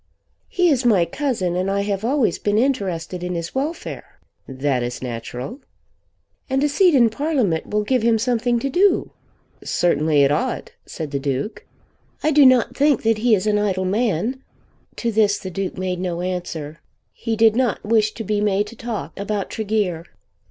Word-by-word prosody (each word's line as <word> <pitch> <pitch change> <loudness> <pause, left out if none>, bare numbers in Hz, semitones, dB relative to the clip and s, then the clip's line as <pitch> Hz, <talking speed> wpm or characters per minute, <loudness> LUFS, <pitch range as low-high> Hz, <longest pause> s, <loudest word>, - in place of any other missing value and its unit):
"He 360 -1 +2
is 265 -3 +1
my 205 -8 +4
cousin, 190 - -2
and 185 +2 0
I 200 0 0
have 200 0 -2
always 250 - +1
been 205 0 0
interested 190 -9 -1
in 180 0 -3
his 170 0 -4
welfare." 290 +6 -5 0.3
"That 130 -1 -1
is 120 +1 -4
natural." 125 - -6 0.9
"And 265 +1 +1
a 295 - +2
seat 350 +2 +4
in 235 -4 +5
Parliament 250 - 0
will 210 0 0
give 255 +3 +1
him 230 0 +3
something 240 +1 +1
to 275 - -1
do." 370 +4 +2 0.5
"Certainly 155 -3 +2
it 140 - +3
ought," 150 - -2 0.2
said 155 -3 -6
the 140 - -1
Duke. 140 - -3 0.6
"I 310 - +3
do 290 -2 +7
not 255 -2 +3
think 285 -3 +2
that 225 -1 +2
he 230 0 +4
is 195 - -2
an 210 -1 +2
idle 190 -3 0
man." 220 +4 0 0.5
To 235 - -2
this 210 -1 +3
the 185 - -7
Duke 190 +1 -4
made 185 -1 -2
no 175 -2 -3
answer. 170 -4 -4 0.3
He 230 -2 -3
did 225 0 +4
not 245 -5 0
wish 215 -1 +2
to 225 - -5
be 210 0 -1
made 205 0 +1
to 235 - -12
talk 230 -3 -6
about 200 0 -3
Tregear. 205 -6 -1
210 Hz, 180 wpm, -21 LUFS, 180-245 Hz, 0.9 s, do